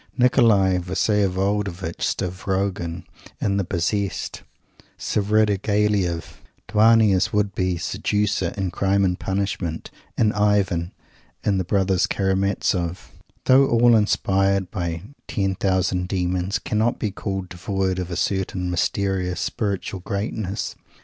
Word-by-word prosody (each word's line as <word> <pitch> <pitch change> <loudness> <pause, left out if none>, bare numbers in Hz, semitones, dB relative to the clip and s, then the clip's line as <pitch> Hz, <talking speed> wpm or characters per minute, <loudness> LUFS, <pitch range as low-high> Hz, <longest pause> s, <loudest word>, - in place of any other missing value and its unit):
Nikolay 115 -7 +4
Vsyevolodovitch 95 -1 -1
Stavrogin, 90 -1 -2 0.4
in 100 -1 0
"the 100 - +1
Possessed;" 95 +2 -2 0.6
Svridigilaiof 105 -3 +1 0.3
Dounia's 110 -2 +4
would 105 -3 +1
be 90 -1 0
seducer, 105 +5 -1
in 95 -3 -1
"Crime 100 +2 +1
and 90 -1 0
Punishment," 95 -4 -3 0.3
and 110 -2 +3
Ivan, 100 -4 +1 0.5
in 100 -2 +1
"the - - 0
Brothers 95 -1 +1
Karamazov," 95 -3 -1 0.3
though 135 +1 +6
all 120 0 +5
inspired 100 -2 +1
by 85 -4 -3 0.2
ten 95 -1 0
thousand 95 -1 0
demons, 90 +1 -1
cannot 110 +2 0
be 105 - -2
called 95 -2 -4
devoid 95 +1 -2
of 90 -1 -4
a 85 - -4
certain 90 -1 -1
mysterious 90 0 -1
spiritual 100 -2 -2
greatness. 100 +1 -3
95 Hz, 110 wpm, -23 LUFS, 90-105 Hz, 0.6 s, though